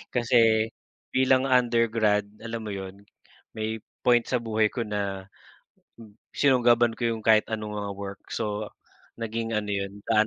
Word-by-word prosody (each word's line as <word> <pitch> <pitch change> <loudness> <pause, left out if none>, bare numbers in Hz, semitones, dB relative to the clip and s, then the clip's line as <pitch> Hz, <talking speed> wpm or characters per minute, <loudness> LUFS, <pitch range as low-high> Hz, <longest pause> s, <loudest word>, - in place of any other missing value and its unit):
kasi 115 -2 +3 0.5
bilang 130 0 +4
undergrad, 115 -4 +3 0.2
alam 115 0 -5
mo 105 - -5
yun, 95 +1 -8 0.5
may 110 +1 -3 0.3
point 120 -1 +5
sa 125 - +1
buhay 110 -2 +1
ko 120 - -2
na 100 -2 -3 1.1
sinunggaban 120 -4 +4
ko 120 -1 +1
yung - - -8
kahit 110 -1 +5
anong 105 -1 -4
mga 100 -1 -3
work. 100 0 -7
So 105 -1 -3 0.5
naging 115 0 -3
ano 105 -1 -2
yun, 100 0 -4
daan 110 0 +4
110 Hz, 140 wpm, -26 LUFS, 105-115 Hz, 1.1 s, point